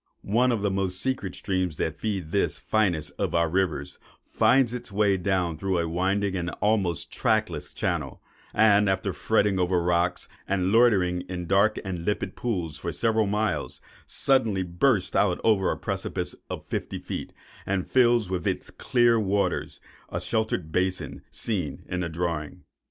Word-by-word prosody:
One 120 Hz, +5 st, +2 dB
of 110 Hz, -4 st, -1 dB
the 100 Hz, -, +1 dB
most 95 Hz, -1 st, -1 dB
secret 130 Hz, -8 st, -2 dB
streams 95 Hz, -5 st, -2 dB
that 80 Hz, -1 st, -2 dB
feed 95 Hz, -7 st, -3 dB
this -, -, +1 dB
finest 90 Hz, -9 st, 0 dB
of -, -, -1 dB
our 85 Hz, 0 st, +3 dB
rivers, 80 Hz, -5 st, -1 dB, 0.3 s
finds 130 Hz, -2 st, +4 dB
its 120 Hz, -3 st, -6 dB
way 100 Hz, -1 st, +3 dB
down 90 Hz, -4 st, -1 dB
through 95 Hz, 0 st, 0 dB
a 85 Hz, -1 st, 0 dB
winding 95 Hz, +3 st, 0 dB
and 85 Hz, -2 st, -2 dB
almost 100 Hz, -6 st, +1 dB
trackless -, -, 0 dB
channel; -, -, -3 dB, 0.3 s
and 105 Hz, -2 st, +4 dB
after 95 Hz, 0 st, 0 dB
fretting 100 Hz, +3 st, +1 dB
over 90 Hz, 0 st, +2 dB
rocks, 90 Hz, +1 st, 0 dB, 0.2 s
and 95 Hz, -1 st, +1 dB
loitering 100 Hz, -6 st, +4 dB
in 90 Hz, -1 st, -4 dB
dark 100 Hz, +4 st, +3 dB
and 90 Hz, -3 st, -4 dB
limpid 105 Hz, +3 st, -2 dB
pools 90 Hz, -10 st, -3 dB
for -, -, -3 dB
several 110 Hz, -2 st, +1 dB
miles, 100 Hz, -7 st, -1 dB, 0.3 s
suddenly 110 Hz, -8 st, +2 dB
bursts 95 Hz, +3 st, +1 dB
out 95 Hz, -3 st, +2 dB
over 100 Hz, -4 st, +3 dB
a -, -, -1 dB
precipice -, -, -3 dB, 0.2 s
of -, -, -6 dB
fifty -, -, -4 dB
feet, -, -, -6 dB, 0.4 s
and 95 Hz, -2 st, 0 dB
fills 120 Hz, -4 st, +3 dB
with 90 Hz, -2 st, -2 dB
its -, -, -2 dB
clear 120 Hz, -2 st, +3 dB
waters 100 Hz, -1 st, -1 dB, 0.3 s
the -, -, -2 dB
sheltered 110 Hz, -8 st, -1 dB
basin 90 Hz, +2 st, -1 dB
seen 90 Hz, -11 st, -2 dB
in 90 Hz, -, -3 dB
the 85 Hz, -1 st, -2 dB
drawing. 80 Hz, -2 st, -3 dB
95 Hz, 160 wpm, -26 LUFS, 90-110 Hz, 0.4 s, finds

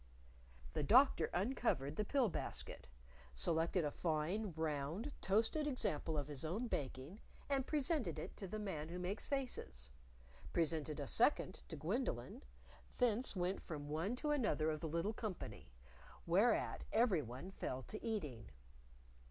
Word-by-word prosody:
The -, -, 0 dB
Doctor 235 Hz, -, +6 dB
uncovered 180 Hz, -, 0 dB
the 210 Hz, -, +1 dB
pill 260 Hz, +3 st, +3 dB
basket, 190 Hz, -, -5 dB, 0.5 s
selected 160 Hz, -, +2 dB
a 145 Hz, -, 0 dB
fine, 175 Hz, +7 st, 0 dB
round, 160 Hz, -, -2 dB
toasted 225 Hz, +10 st, +2 dB
example 195 Hz, -, 0 dB
of 145 Hz, -1 st, -1 dB
his 145 Hz, -2 st, -4 dB
own 185 Hz, +10 st, -1 dB
baking, 140 Hz, -, -4 dB, 0.3 s
and 275 Hz, -2 st, +1 dB
presented 295 Hz, -2 st, +1 dB
it -, -, -5 dB
to 195 Hz, -, -4 dB
the 215 Hz, -, -4 dB
Man 165 Hz, -7 st, -3 dB
Who 175 Hz, -, -4 dB
Makes 180 Hz, +3 st, -2 dB
Faces; 65 Hz, -, -2 dB, 0.6 s
presented 155 Hz, -3 st, +1 dB
a -, -, -2 dB
second -, -, +3 dB
to -, -, -5 dB
Gwendolyn; -, -, -2 dB, 0.6 s
thence 245 Hz, -1 st, +2 dB
went 185 Hz, +1 st, 0 dB
from 145 Hz, -3 st, -6 dB
one 165 Hz, +10 st, 0 dB
to 295 Hz, +4 st, -1 dB
another 215 Hz, -, +2 dB
of 155 Hz, -, -2 dB
the 160 Hz, -, -3 dB
little 170 Hz, +7 st, 0 dB
company, 210 Hz, -, -5 dB, 0.5 s
whereat 200 Hz, +7 st, +3 dB
everyone 180 Hz, -, +1 dB
fell 130 Hz, -8 st, -3 dB
to 215 Hz, -, -7 dB
eating. 150 Hz, -, -3 dB
180 Hz, 140 wpm, -39 LUFS, 150-225 Hz, 0.6 s, Doctor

